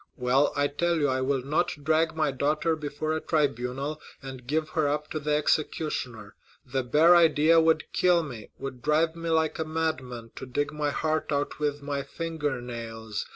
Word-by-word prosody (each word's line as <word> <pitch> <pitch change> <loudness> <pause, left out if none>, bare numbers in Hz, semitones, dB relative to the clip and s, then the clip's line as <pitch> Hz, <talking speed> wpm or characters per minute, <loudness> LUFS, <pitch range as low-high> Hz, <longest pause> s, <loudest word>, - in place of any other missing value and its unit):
Well, 130 +3 +3
I 145 - +2
tell 170 +4 0
you 145 -3 +2
I 130 0 0
will 130 -1 0
not 155 +6 0
drag 160 +1 +2
my 155 -2 +1
daughter 150 +4 +1
before 155 +1 -3
a 160 - -2
tribunal, 140 0 -1 0.2
and 130 -2 -9
give 155 +2 0
her 155 -3 +1
up 150 +1 -2
to 155 - -2
the 150 0 0
executioner! 145 -8 -1 0.3
The 135 +1 -1
bare 150 +8 +5
idea 165 -1 +5
would 160 -1 +1
kill 175 -2 +3
me—would 125 0 -8
drive 160 +4 +2
me 165 0 -4
like 160 -1 +1
a - - +1
madman 145 -8 -3
to 130 - -7
dig 145 +4 -2
my 150 -1 -1
heart 155 +2 -1
out 145 +1 -1
with 145 -1 -1
my 140 -1 -2
finger 150 -1 -3
nails! 115 -3 -6
150 Hz, 180 wpm, -27 LUFS, 130-160 Hz, 0.3 s, bare